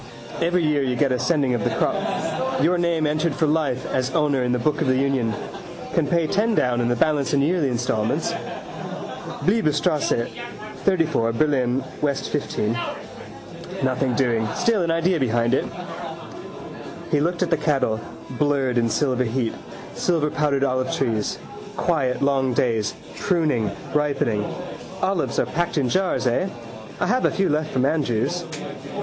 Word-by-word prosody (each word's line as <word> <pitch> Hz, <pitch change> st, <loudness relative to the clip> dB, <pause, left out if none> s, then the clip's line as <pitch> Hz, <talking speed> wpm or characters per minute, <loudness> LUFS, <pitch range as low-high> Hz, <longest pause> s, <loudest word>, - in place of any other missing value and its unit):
Every 175 Hz, +1 st, +2 dB
year 150 Hz, -2 st, +2 dB
you 130 Hz, -2 st, 0 dB
get 135 Hz, +1 st, +2 dB
a 125 Hz, -, +1 dB
sending 145 Hz, -6 st, +2 dB
of 120 Hz, -, 0 dB
the -, -, +2 dB
crop. 130 Hz, +1 st, -1 dB
Your 175 Hz, +2 st, +3 dB
name 170 Hz, -2 st, +1 dB
entered 155 Hz, 0 st, +1 dB
for 160 Hz, -, +2 dB
life 150 Hz, -5 st, 0 dB
as 130 Hz, 0 st, 0 dB
owner 145 Hz, -5 st, +2 dB
in 125 Hz, -, 0 dB
the 125 Hz, -, +2 dB
book 150 Hz, +4 st, 0 dB
of -, -, +1 dB
the 130 Hz, -, +3 dB
union. 135 Hz, -4 st, +1 dB, 0.6 s
Can -, -, +2 dB
pay 170 Hz, -2 st, +2 dB
ten 210 Hz, +7 st, +1 dB
down 120 Hz, -6 st, +2 dB
and 120 Hz, -, +1 dB
the 120 Hz, -, +2 dB
balance 150 Hz, +3 st, +1 dB
in 140 Hz, -, +3 dB
yearly 165 Hz, -1 st, +2 dB
instalments. 120 Hz, -3 st, 0 dB, 1.1 s
Bleibtreustrasse 155 Hz, -, +2 dB, 0.6 s
34, 165 Hz, -, +2 dB
Berlin, 130 Hz, -1 st, +1 dB, 0.2 s
W. 145 Hz, -2 st, +2 dB
15. 115 Hz, -6 st, -2 dB, 1.1 s
Nothing 130 Hz, -1 st, +1 dB
doing. 115 Hz, -4 st, +1 dB
Still 225 Hz, -4 st, +2 dB
an 170 Hz, -, 0 dB
idea 165 Hz, +1 st, +2 dB
behind 120 Hz, -2 st, +1 dB
it. -, -, +2 dB, 1.5 s
He 150 Hz, -, +3 dB
looked 170 Hz, +3 st, +1 dB
at -, -, -2 dB
the 165 Hz, -, +4 dB
cattle, 135 Hz, -7 st, +1 dB, 0.3 s
blurred 135 Hz, -2 st, +1 dB
in 115 Hz, -1 st, +2 dB
silver 130 Hz, +2 st, +1 dB
heat. 115 Hz, 0 st, -1 dB, 0.4 s
Silverpowdered 150 Hz, -4 st, +1 dB
olivetrees. 130 Hz, -4 st, 0 dB, 0.4 s
Quiet 140 Hz, -7 st, +1 dB
long 135 Hz, -2 st, +2 dB
days: 115 Hz, -4 st, +1 dB, 0.2 s
pruning, 150 Hz, -, +1 dB, 0.2 s
ripening. 135 Hz, -8 st, +1 dB, 0.5 s
Olives 190 Hz, -3 st, 0 dB
are -, -, +3 dB
packed 175 Hz, 0 st, -1 dB
in 135 Hz, -3 st, +2 dB
jars, 185 Hz, +2 st, +1 dB
eh? 130 Hz, +11 st, +1 dB, 0.5 s
I -, -, +1 dB
have 250 Hz, +6 st, +2 dB
a -, -, +5 dB
few 195 Hz, -1 st, +1 dB
left 155 Hz, +1 st, 0 dB
from 130 Hz, 0 st, +1 dB
Andrews. 150 Hz, +3 st, 0 dB
140 Hz, 150 wpm, -23 LUFS, 125-160 Hz, 1.5 s, a